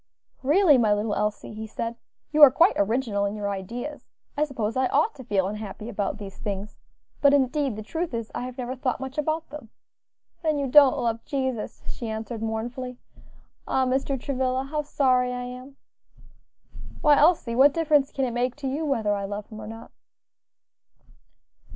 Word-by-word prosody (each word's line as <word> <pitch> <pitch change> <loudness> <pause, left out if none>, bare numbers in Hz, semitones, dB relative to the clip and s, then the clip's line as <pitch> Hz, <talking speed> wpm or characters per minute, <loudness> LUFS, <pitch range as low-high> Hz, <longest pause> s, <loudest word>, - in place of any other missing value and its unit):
"Really, 295 0 +5
my 215 -3 +3
little 210 0 -1
Elsie," 210 +1 -2
he 220 +1 -6
said, 230 +2 -4 0.4
"you 305 0 +2
are 290 - +12
quite 330 +8 +4
original 215 0 0
in 200 +1 -2
your 205 -1 -2
ideas, 235 +10 -6 0.3
I 300 - +2
suppose 230 -6 -3
I 260 0 +2
ought 310 - +2
to 260 - -11
feel 200 -5 +1
unhappy 210 +1 -6
about 200 -3 -2
these 200 -2 -9
things, 200 0 -5 0.5
but 280 0 +6
indeed 275 -2 +1
the 215 - -6
truth 330 +9 -3
is, 230 -2 -4
I - - -3
have 255 0 -8
never 255 0 -4
thought 255 -1 -2
much 265 +2 -5
about 315 +1 -2
them." 290 -7 -9 0.7
"Then 310 -3 +1
you 280 - 0
don't 280 +1 +6
love 230 -3 -1
Jesus," 260 -6 -3
she 230 - -5
answered, 220 +1 -5
mournfully. 240 +3 -4 0.7
"Ah! 265 - +2
Mr. 265 +1 0
Travilla, 260 -1 -1
how 300 +2 -2
sorry 255 -4 +2
I 250 0 -4
am." 250 +2 -9 1.3
"Why, 295 -2 +6
Elsie, 305 -7 +3
what 275 +4 +7
difference 295 -3 +2
can 270 - -1
it 245 - -2
make 245 +1 0
to 290 -2 -5
you 280 +5 -2
whether 230 -8 +1
I 200 -1 -2
love 205 +1 -5
Him 215 -1 -9
or 215 - -8
not?" 225 +1 -10
255 Hz, 180 wpm, -25 LUFS, 220-280 Hz, 1.3 s, are